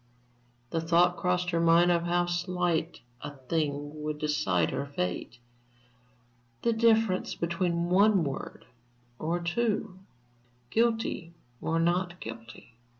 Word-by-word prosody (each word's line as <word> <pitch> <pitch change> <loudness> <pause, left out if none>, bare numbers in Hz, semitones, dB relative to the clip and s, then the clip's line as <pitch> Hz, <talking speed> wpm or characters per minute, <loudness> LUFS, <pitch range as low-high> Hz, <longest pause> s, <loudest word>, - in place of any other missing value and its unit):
The 165 - 0
thought 175 +2 +3
crossed 180 0 0
her 170 - +1
mind 170 +1 +5
of 170 -1 +1
how 175 0 +2
slight 175 -3 -1 0.2
a 145 0 -7
thing 145 +1 -3
would 150 0 -3
decide 95 - 0
her 140 - -3
fate 110 -2 -4 1.3
the 235 - +3
difference 225 -4 +2
between 170 0 -1
one 195 0 +4
word 140 -2 -6 0.5
or 165 +3 -1
two, 200 +2 -1 0.7
guilty 225 -7 0 0.3
or 165 +1 0
not 175 +1 0
guilty. 115 +1 -10
170 Hz, 115 wpm, -29 LUFS, 150-180 Hz, 1.3 s, mind